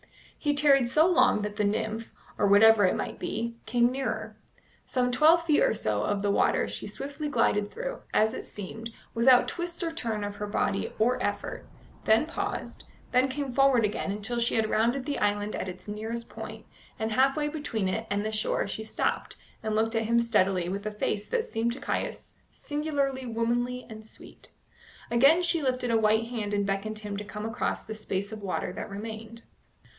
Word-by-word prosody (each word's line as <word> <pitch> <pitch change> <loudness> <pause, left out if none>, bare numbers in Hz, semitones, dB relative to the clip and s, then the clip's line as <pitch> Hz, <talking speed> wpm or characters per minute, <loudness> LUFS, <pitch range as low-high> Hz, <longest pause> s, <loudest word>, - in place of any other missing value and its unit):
He 290 -1 0
tarried 280 -4 +4
so 310 +5 +5
long 340 - +4
that 210 0 -4
the 210 - +1
nymph, 215 +2 -1 0.3
or - - +2
whatever 205 +1 +7
it 185 - +2
might - - -4
be, 230 +1 -3
came 240 +1 +3
nearer. 220 -5 -3 0.5
Some 250 -1 0
twelve 315 +6 +5
feet 310 -3 +3
or - - +3
so 105 - 0
of 200 - -1
the 200 - +2
water - - +2
she - - -4
swiftly 285 +2 -5
glided 210 -7 +2
through, - - -5
as 220 +1 +3
it - - -6
seemed, 220 +3 -7 0.2
without 245 +2 +5
twist 345 0 -3
or 330 - -1
turn 225 -9 -3
of 205 0 -5
her 210 - -4
body 200 -1 -1
or 245 +3 +2
effort; - - -3 0.4
then 220 +6 +4
paused; 400 +5 -5 0.3
then 255 +1 +4
came 270 -1 -4
forward 270 -4 +4
again, 205 -1 -2
until 215 +4 0
she 235 - +1
had 220 -1 +2
rounded 240 +4 +1
the 290 -1 -2
island 205 0 0
at 185 - -3
its 185 +3 -10
nearest 225 +3 -4
point, - - -9 0.3
and 220 0 -2
half 265 +5 +3
way 295 -1 0
between 285 -10 -2
it 220 +4 -2
and 205 +1 -1
his 215 - -2
shore 215 - 0
she 215 +2 -4
stopped, 220 - -2 0.3
and 220 -1 -2
looked 225 +1 +1
at 225 0 +1
him 235 +2 +3
steadily 190 -6 +2
with 200 +3 -3
a - - -2
face 210 0 -2
that 475 -2 0
seemed 235 - -1
to 260 - -8
Caius 280 - -3 0.2
singularly 285 -3 -2
womanly 240 +2 -1
and 220 -2 -10
sweet. 215 - -14 0.6
Again 275 +9 +5
she 340 -2 +2
lifted 255 -3 0
a 230 - +4
white 220 +1 +3
hand 210 -4 -2
and 205 0 +1
beckoned 200 +2 -2
him 205 -1 -5
to 205 - -4
come 210 +1 -6
across 225 +2 -2
the 220 - -5
space 200 -1 -3
of 215 -1 -7
water 185 -2 -3
that - - -6
remained. 220 +2 -7
225 Hz, 195 wpm, -28 LUFS, 210-265 Hz, 0.6 s, whatever